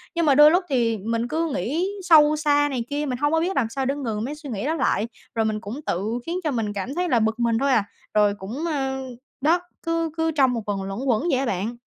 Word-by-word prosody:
Nhưng 335 -1 +1
mà 285 -3 +5
đôi 295 +2 +8
lúc 355 +3 +3
thì 235 -4 +1
mình 230 +3 -2
cứ 320 +4 -1
nghĩ 315 +8 -1 0.2
sâu 305 -4 +6
xa 290 -1 +2
này 255 -4 -2
kia, 290 +1 -2
mình 255 -3 -2
hông 290 +3 +1
có 325 - +3
biết 360 +4 -1
làm 240 - +1
sao 270 +3 -3
để 275 +2 0
ngừng 225 -7 -3
mấy 290 +4 -4
suy 300 -2 -10
nghĩ 215 -1 -3
đó 310 - +1
lại, 240 -8 0 0.3
rồi 225 -1 +1
mình 215 -1 -1
cũng 230 +6 -6
tự 215 +7 -1
khiến 345 +2 -2
cho 305 - 0
mình 225 -5 -2
cảm 205 +8 -4
thấy 360 0 0
là 240 - +3
bực 220 +1 0
mình 235 -1 +2
thôi 275 +3 +1
à, 225 -5 +3 0.3
rồi 210 -1 +4
cũng, 220 - -5
ơ 270 -5 -1 0.4
đó, 325 +5 +3 0.2
cứ 330 -1 0
cứ 325 0 +1
trong 270 -5 +3
một 230 -2 -3
vòng 200 -2 -2
luẩn 195 +2 -5
quẩn 245 -1 +1
vậy 260 - +2
á 270 - 0
bạn. 215 +2 -2
265 Hz, 265 wpm, -23 LUFS, 225-305 Hz, 0.4 s, đôi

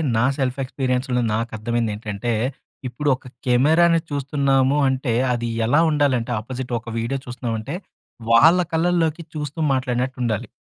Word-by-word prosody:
నా 115 - +3
సెల్ఫ్ 130 -1 -1
ఎక్స్‌పీరియన్స్‌లో 125 -1 -1
నాకర్థమైంది 115 0 -1
ఏంటంటే, 105 +2 -4 0.6
ఇప్పుడు 145 +5 -2
ఒక 130 - -20 0.2
కెమెరాని 160 +7 +4
చూస్తున్నాము 140 -1 +1
అంటే, 130 -2 -1 0.2
అది 120 -1 -2 0.2
ఎలా 145 +7 +3
ఉండాలంటే 140 -6 +1
అపోజిట్ 125 +2 -6
ఒక 115 0 -9
వీడియో 115 +4 -2
చూస్తున్నామంటే, 120 0 -4 0.6
వాళ్ళ 160 +10 +7 0.2
కళ్ళల్లోకి 165 -1 +1
చూస్తూ 150 +1 -5
మాట్లాడినట్టు 130 0 -1
ఉండాలి. 110 -4 -1
130 Hz, 125 wpm, -22 LUFS, 120-145 Hz, 0.6 s, వాళ్ళ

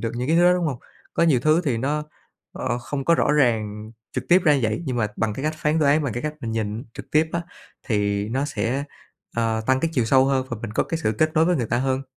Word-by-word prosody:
được 115 - -2
những 125 +2 -3
cái 165 - +3
thứ 175 - +5
đó, 180 - +6
đúng 180 -1 0
hông? 135 -5 -3 0.4
Có - - +2
nhiều 150 -7 +4
thứ 155 +5 +3
thì 135 -6 +1
nó, 145 +5 -1 0.5
ờ, 120 -1 -2
không 135 +3 -4
có 170 - +4
rõ 150 - +2
ràng 110 -6 +1 0.2
trực 130 -1 -3
tiếp 180 +1 +5
ra 150 - +5
như 140 - +1
vậy, 110 +8 -1
nhưng 125 -2 -2
mà 110 -3 +1
bằng 110 -2 -1
cái 135 - -5
cách 155 - 0
phán 155 +1 0
đoán, 150 0 +3
bằng 135 -6 -2
cái 120 - -4
cách 155 0 -3
mình 115 -3 -4
nhìn 110 +2 -3
trực - - -10
tiếp 155 +1 +3
á 170 - 0 0.4
thì 100 -3 0
nó 130 +5 -1
sẽ, 130 +2 -2 0.5
ờ, 115 -1 +1
tăng 130 0 +3
cái 165 - 0
chiều 125 - +2
sâu 130 +3 +4
hơn 135 -1 +1
và 120 - -4
mình 115 - -4
có - - +2
cái 165 - -3
sự 110 - +1
kết 155 0 +3
nối 160 +1 +4
với 180 -1 +2
người 120 - -1
ta 120 +2 0
hơn. 130 +1 0
130 Hz, 280 wpm, -23 LUFS, 115-150 Hz, 0.5 s, đó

